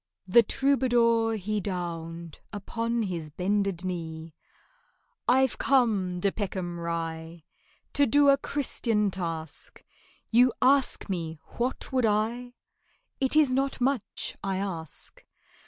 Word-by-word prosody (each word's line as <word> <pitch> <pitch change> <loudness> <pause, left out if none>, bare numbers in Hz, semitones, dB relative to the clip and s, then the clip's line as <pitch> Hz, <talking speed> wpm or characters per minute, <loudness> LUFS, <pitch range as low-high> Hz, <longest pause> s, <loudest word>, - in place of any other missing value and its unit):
The 215 +6 +7
troubadour 235 -4 +2
he 210 +1 -2
downed 170 -3 -5
Upon 230 +3 -2
his 170 -6 -4
bended 190 +2 -1
knee. 165 -3 -5 0.9
"I've 260 +1 +3
come, 210 -9 +2
DE 200 +2 +1
PECKHAM 185 -4 -4
RYE, 165 -1 -4 0.5
To 285 -1 +4
do 285 +4 +5
a 275 - +6
Christian 230 -7 -1
task; 165 -4 -5 0.5
You 245 +2 +5
ask 270 0 +3
me 165 -5 -3 0.2
what 250 +2 -2
would 255 -3 +3
I? 235 +4 -1 0.6
It 265 +2 +1
is 295 -4 +5
not 270 +1 0
much 250 -5 -1
I 195 -1 -1
ask. 170 -6 -6
205 Hz, 115 wpm, -27 LUFS, 170-245 Hz, 0.9 s, The